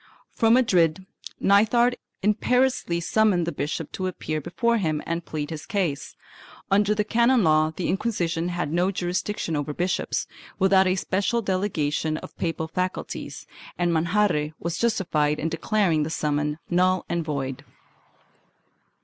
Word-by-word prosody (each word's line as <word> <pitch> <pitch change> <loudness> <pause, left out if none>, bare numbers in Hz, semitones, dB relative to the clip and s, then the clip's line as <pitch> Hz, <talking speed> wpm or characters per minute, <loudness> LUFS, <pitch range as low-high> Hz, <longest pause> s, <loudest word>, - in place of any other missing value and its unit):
From 225 0 +3
Madrid, 185 -8 +2 0.3
Nithard 230 +5 +4 0.3
imperiously 220 -3 +1
summoned 185 0 +2
the 170 - -2
bishop 150 +1 -4
to 185 - -3
appear 155 -4 -3
before 235 - 0
him 155 -5 0
and 170 +1 -2
plead 150 -1 -5
his 155 -1 -7
case. 180 -9 -2 0.6
Under 205 +1 +3
the 210 - +1
canon 235 +2 +3
law, 155 -1 +3
the 180 - -2
Inquisition 175 -5 -1
had 175 -3 -3
no 175 +2 +2
jurisdiction 180 -1 -2
over 145 0 -3
bishops, 180 +1 -1 0.3
without 190 -1 +4
a 185 - +2
special 200 +5 0
delegation 160 -6 -1
of - - -10
papal 165 -2 -2
faculties, 180 +3 -4 0.3
and 175 -1 +1
Manjarre 165 -2 +1
was 170 +1 -3
justified 165 -10 +1
in 160 - -2
declar 185 +4 +1
ing 155 -1 +2
the 150 - -1
summons 150 -1 -1
null 185 +1 +2
and 170 -1 -1
void. 140 -3 -4
175 Hz, 140 wpm, -25 LUFS, 155-205 Hz, 0.6 s, Nithard